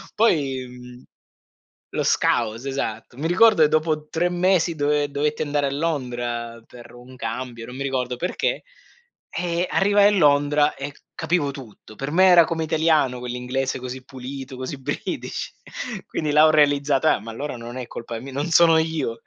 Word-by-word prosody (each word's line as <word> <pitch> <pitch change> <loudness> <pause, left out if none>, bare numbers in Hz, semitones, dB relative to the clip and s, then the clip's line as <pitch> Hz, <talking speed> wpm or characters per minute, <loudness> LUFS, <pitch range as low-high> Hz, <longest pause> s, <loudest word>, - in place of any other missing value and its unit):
Poi 140 - +1
mhmm, 125 0 -13 0.9
lo - - -1
scouse 115 +3 +1
esatto. 120 -4 -4
Mi 155 +4 -2
ricordo 200 0 +5
che 150 - +6
dopo 155 -1 0
3 175 +2 0
mesi 175 -1 +2
dove 145 -1 +1
dovetti 150 +1 -1
andare 145 -1 0
a - - -2
Londra 120 -6 -3
per 120 -1 -14
un 125 +1 -13
cambio, 120 0 -5
non 125 +2 -9
mi 140 - -3
ricordo 130 -2 -2
perché, 180 +8 -2 0.7
eh 175 +1 -2
arrivai 205 +1 +4
a 205 0 +2
Londra 145 -1 +3
e 140 +1 -6 0.2
capivo 160 -3 0
tutto. 115 -5 -12
Per 135 +5 -5
me 185 +3 +5
era 175 -2 +8
come 160 0 -2
italiano 155 -5 +2
quell'inglese 125 +2 -3
così 130 +1 -7
pulito, 130 0 -8
così 130 +2 -5
British. - - -4 0.5
Quindi 155 -2 -2
là 150 +1 +6
ho 155 - +6
realizzato: 145 -1 +3
"Eh, 155 - +3
ma 115 +1 -8
allora 140 +5 -5
non 120 +1 -8
è 125 -2 -6
colpa 115 -1 -7
mi 135 +4 -9
non 145 +5 -3
sono 165 0 +6
io 160 -8 -1
140 Hz, 170 wpm, -23 LUFS, 125-160 Hz, 0.9 s, era